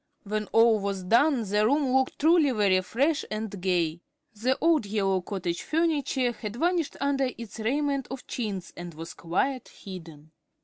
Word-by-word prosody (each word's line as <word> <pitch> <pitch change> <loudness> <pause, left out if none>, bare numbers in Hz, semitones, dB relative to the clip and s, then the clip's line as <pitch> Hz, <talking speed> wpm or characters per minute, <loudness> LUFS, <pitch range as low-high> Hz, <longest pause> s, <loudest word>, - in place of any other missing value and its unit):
When 215 +1 -2
all 225 -1 +5
was 200 -1 -3
done 240 +6 +3
the 210 +2 +2
room 280 0 +2
looked 265 0 +2
truly 315 -1 +4
very 200 -6 +3
fresh 280 - 0
and 215 -3 -4
gay. 175 -3 0 0.3
The 245 +5 0
old 320 -9 +3
yellow 195 -2 +1
"cottage 180 -2 -3
furniture" 290 -6 +1
had 215 -2 -7
vanished 335 +3 0
under 275 -1 +1
its 230 -1 -9
raiment 275 +3 0
of 265 0 -7
chintz 200 -7 -4
and 175 -2 -8
was 165 +1 -7
quite 235 +10 -1
hidden. 165 -5 -11
225 Hz, 160 wpm, -27 LUFS, 190-275 Hz, 0.3 s, all